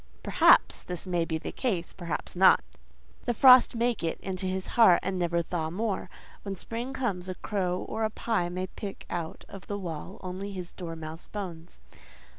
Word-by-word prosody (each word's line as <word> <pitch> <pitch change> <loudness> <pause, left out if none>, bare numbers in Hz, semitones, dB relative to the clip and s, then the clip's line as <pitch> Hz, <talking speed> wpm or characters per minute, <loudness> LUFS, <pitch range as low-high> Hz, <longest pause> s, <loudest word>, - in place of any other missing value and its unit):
Perhaps - - +5
this 180 0 -5
may 175 -2 0
be 160 -1 -1
the - - -6
case, 190 -10 -2
perhaps 170 -1 -4
not: 190 +2 +6 0.6
the 240 - 0
frost 255 0 +8
may 240 +1 +2
get 165 -7 -3
into 190 0 -3
his 185 0 -2
heart 225 -7 +7
and 185 -1 -2
never 170 -1 +1
thaw 160 -1 -2
more; 195 +1 -2 0.3
when 200 -1 -5
spring 230 +7 -5
comes, 200 -9 -2
a 185 - -3
crow 185 -4 -1
or 220 +1 -2
a 215 - +2
pie 215 -5 -1
may 185 +1 -3
pick 195 +1 -8
out 165 -2 -4
of 195 -1 -11
the 205 - -3
wall 175 0 -6
only 190 +2 -5
his 180 -2 -6
dormouse 165 -2 -7
bones. 175 -5 -7
185 Hz, 180 wpm, -28 LUFS, 175-205 Hz, 0.6 s, frost